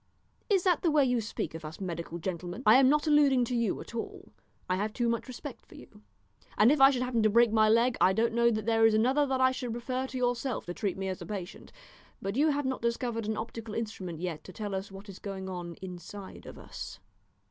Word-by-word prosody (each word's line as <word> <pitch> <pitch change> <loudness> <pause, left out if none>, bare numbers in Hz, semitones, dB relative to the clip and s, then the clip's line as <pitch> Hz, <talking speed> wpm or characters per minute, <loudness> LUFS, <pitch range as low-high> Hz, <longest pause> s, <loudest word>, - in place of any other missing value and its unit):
"Is 390 -4 +3
that 360 -5 +2
the 340 - +2
way 295 -3 +4
you 245 -2 +1
speak 215 - -4
of 165 0 -8
us 155 +1 -8
medical 170 -3 -5
gentlemen?" 175 +5 -5
"I 215 +4 +8
am 265 -1 +6
not 300 +1 +2
alluding 285 -5 +4
to 245 - -3
you 235 -4 0
at - - -11
all. 390 - -6 0.3
I 185 - +1
have 210 +2 -2
too 240 0 0
much 230 +2 -1
respect 255 -2 -8
for - - -17
you, - - -15 0.6
and 215 +5 +6
if 295 -2 +2
I 270 - +10
should 255 -2 0
happen 250 -2 0
to 215 - +4
break 235 +1 +4
my 215 -1 +4
leg 230 +2 +3
I 185 - +6
don't 225 +4 +1
know 235 0 +4
that 215 -2 -2
there 225 0 +4
is 220 - +2
another 260 +6 +3
that 265 -1 0
I 260 0 +5
should 250 -2 -4
prefer 255 +2 -3
to 260 - -6
yourself 245 0 -1
to 175 - -5
treat 195 0 -2
me 190 0 -3
as 185 -1 -4
a - - -6
patient, 195 -4 -7 0.5
but 195 +2 -4
you 300 +4 +3
have 290 -1 0
not 260 0 -2
discovered 235 -1 -2
an 220 - -1
optical 225 -1 -6
instrument 190 -7 -5
yet 165 -4 -4
to - - -9
tell 210 +1 -5
what 195 +1 -6
is 195 -2 -10
going 195 -2 -6
on 175 -2 -6
inside 185 +2 -9
of - - -10
us." - - -8
225 Hz, 245 wpm, -29 LUFS, 195-255 Hz, 0.6 s, I